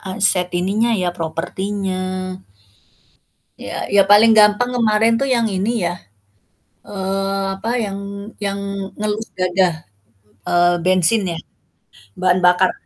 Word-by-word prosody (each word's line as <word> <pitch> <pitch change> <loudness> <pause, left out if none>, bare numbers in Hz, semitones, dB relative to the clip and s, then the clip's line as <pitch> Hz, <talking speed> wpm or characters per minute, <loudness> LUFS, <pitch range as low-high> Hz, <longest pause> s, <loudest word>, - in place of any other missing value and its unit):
aset 190 -2 +1
ininya 200 +7 0
ya, 185 -4 0
propertinya. 185 +2 -4 1.2
Ya - - -6
ya 200 -1 +5
paling 210 +3 +6
gampang 210 +4 +4
kemarin 225 0 +3
tuh 275 - -1
yang 235 -4 +1
ini 205 +3 -1
ya, 175 - -3 0.9
eee, 195 0 -2
apa 225 +4 -4
yang 195 -1 -5 0.4
yang 200 -1 -3 0.4
ngelus 215 +1 -2
dada, 180 -3 0 0.7
eee, 175 0 +3
bensin 185 +4 +4
ya, - - -6 0.8
bahan 185 0 +2
bakar. 180 +1 +3
195 Hz, 110 wpm, -19 LUFS, 185-210 Hz, 1.2 s, paling